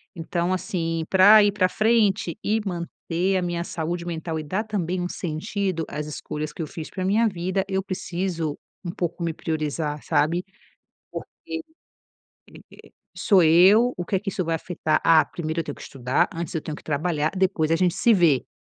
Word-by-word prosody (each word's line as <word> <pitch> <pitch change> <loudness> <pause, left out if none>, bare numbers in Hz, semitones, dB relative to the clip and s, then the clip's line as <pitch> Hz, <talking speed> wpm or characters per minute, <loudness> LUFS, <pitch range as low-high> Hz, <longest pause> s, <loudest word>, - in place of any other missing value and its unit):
Então, 170 +1 -1
assim, 170 -4 -2
pra 205 +3 +8
ir 205 - +3
pra 190 -2 +2
frente 215 -5 +2
e 215 +2 +1
manter 180 +1 -2
a - - 0
minha 175 -1 -2
saúde 170 0 -4
mental 165 -1 -3
e - - -5
dar 185 +8 -2
também 185 -5 -2
um 175 - -1
sentido 180 +1 -3
às 150 0 -4
escolhas 150 0 -5
que - - -6
eu 155 - -3
fiz 155 +1 -7
pra 185 -1 -4
minha 215 +4 +3
vida, 185 0 -1
eu 190 -1 0
preciso 175 -4 -3 0.3
um 175 - -4
pouco 170 -1 -3
me 165 -1 -1
priorizar, 155 -2 -3
sabe, 165 +5 +1 0.7
porque, - - -6 0.2
eh - - -2
eh, - - -5 1.6
sou 195 -4 +4
eu, 190 +10 +6
o 175 - -3
que 195 - 0
é - - +2
que 205 - -6
isso 185 - -2
vai 165 0 -1
afetar? 160 -2 -1
Ah, 160 -1 +6
primeiro 160 -1 -4
eu - - -3
tenho 145 - -5
que - - -13
estudar 130 -1 0
antes 170 +1 -5
eu 160 - 0
tenho 155 - -5
que - - -13
trabalhar, 155 0 0
depois 185 -4 +1
a 165 - +4
gente 180 -1 +2
se 235 - +4
vê. 165 -9 +3
175 Hz, 195 wpm, -24 LUFS, 160-190 Hz, 1.6 s, pra